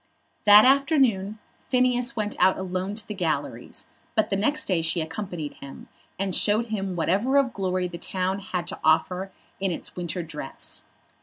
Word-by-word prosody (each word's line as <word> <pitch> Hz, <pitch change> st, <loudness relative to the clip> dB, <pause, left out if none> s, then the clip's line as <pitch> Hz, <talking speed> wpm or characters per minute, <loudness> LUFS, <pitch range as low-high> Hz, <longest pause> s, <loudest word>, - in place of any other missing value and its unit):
That 210 Hz, +1 st, +9 dB
afternoon 260 Hz, -7 st, +3 dB, 0.3 s
Phineas 250 Hz, 0 st, +2 dB
went 210 Hz, -2 st, -2 dB
out 185 Hz, +1 st, +4 dB
alone 190 Hz, +1 st, -3 dB
to 215 Hz, -1 st, -5 dB
the 210 Hz, -, -4 dB
galleries, 175 Hz, -6 st, -3 dB, 0.3 s
but 220 Hz, -2 st, +1 dB
the -, -, +2 dB
next 290 Hz, +10 st, +1 dB
day 180 Hz, -4 st, +1 dB
she 165 Hz, +2 st, +1 dB
accompanied 160 Hz, -1 st, -5 dB
him, 140 Hz, -, -10 dB, 0.3 s
and 195 Hz, -1 st, -1 dB
showed 215 Hz, +2 st, +3 dB
him 195 Hz, -4 st, -2 dB
whatever 200 Hz, -, +1 dB
of 270 Hz, -3 st, +2 dB
glory 185 Hz, -2 st, -1 dB
the 170 Hz, -1 st, -8 dB
town 185 Hz, +2 st, -2 dB
had 185 Hz, -3 st, -4 dB
to -, -, -6 dB
offer 180 Hz, +4 st, +2 dB, 0.3 s
in 195 Hz, 0 st, 0 dB
its 170 Hz, -, -5 dB
winter 175 Hz, 0 st, -3 dB
dress. 150 Hz, -4 st, -6 dB
190 Hz, 165 wpm, -25 LUFS, 180-215 Hz, 0.3 s, That